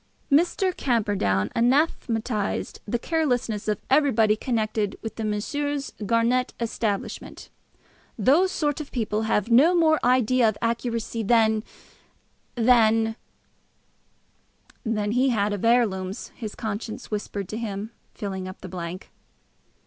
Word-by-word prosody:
Mr. 350 +5 +2
Camperdown 200 - 0
anathematised 235 -4 0
the 240 - 0
carelessness 245 -8 -1
of 210 -1 +1
everybody 235 -7 +4
connected 215 -3 -1
with 225 0 -6
Messrs. 280 +7 -2
Garnett's 235 +3 +1
establishment. 225 -3 -3 0.7
"Those 300 - +4
sort 295 -3 -1
of 290 - -9
people 220 -2 -1
have 210 +3 +1
no 300 +10 +6
more 315 -2 +4
idea 250 -1 +4
of 215 - -5
accuracy 230 0 -2
than 220 0 +3 0.9
than 225 -2 +4 0.9
" - - -35
than 210 0 -1
he 255 +3 +3
had 210 -3 +1
had - - -1
of 205 - -4
heirlooms, 200 -5 +1
his 215 -3 -8
conscience 220 +1 -5
whispered 205 -2 -4
to 215 - -4
him, 210 -1 -4 0.2
filling 190 -3 -4
up 185 - -10
the 185 - -7
blank. 175 +1 -7
225 Hz, 120 wpm, -25 LUFS, 210-255 Hz, 0.9 s, no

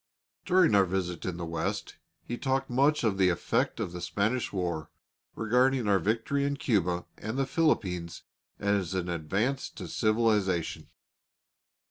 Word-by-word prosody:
During 180 - +4
our 100 -1 +6
visit 90 -2 -3
in 90 -2 -3
the 85 - -4
West, 85 0 -3 0.3
he 120 - -4
talked 135 +1 -1
much 140 +4 +3
of 100 -4 +1
the 95 -1 +5
effect 85 - 0
of - - -2
the 90 0 -6
Spanish 100 +8 -1
war, 85 -5 -2 0.5
regarding 125 +2 +2
our 100 -1 +4
victory 115 - 0
in 140 0 -1
Cuba 90 -9 0
and 110 +4 -4
the 135 - +2
Philippines 95 - 0 0.3
as 100 -3 0
an 90 -1 -2
advance 100 - -1
to - - -8
civilisation. 105 -6 +1
100 Hz, 145 wpm, -29 LUFS, 90-125 Hz, 0.5 s, our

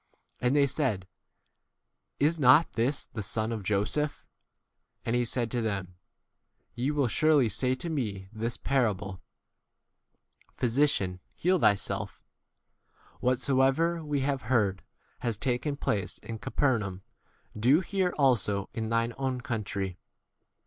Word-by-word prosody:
And 125 +3 +1
they 145 -1 +5
said, 130 -9 -1 1.1
Is 155 +4 +3
23 - - -6
not 135 +5 +6
this 125 +5 0
the 110 - -6
son 110 +2 -1
of 110 -2 -3
Joseph? 105 +10 -1 0.8
And 115 - 0
he 120 - +2
said 120 -1 0
to 120 - 0
them, 100 -5 -3 0.8
Te 125 +3 0
will 145 -3 +1
surely 145 +1 +3
say 125 +5 +1
to 130 - -5
me 105 - -3
this 115 +2 -3
parable, 100 -8 -1 1.4
Physician, 115 -8 +1 0.2
heal 180 +1 +2
thyself; 100 -8 +1 1.0
whatsoever 135 +6 +2
we 145 -2 -1
have 135 0 0
heard 100 -6 +2 0.4
has 115 -4 -2
taken 135 +4 -1
place 100 -7 -1
in 115 -1 -7
Caper 130 0 +1
naum 95 -2 -5 0.5
do 125 - +4
here 190 -2 0
also 110 -8 +2
in 110 -1 -3
thine 115 +1 +1
own 135 -1 0
24 - - -9
country. 100 -7 -3
125 Hz, 130 wpm, -29 LUFS, 105-140 Hz, 1.4 s, not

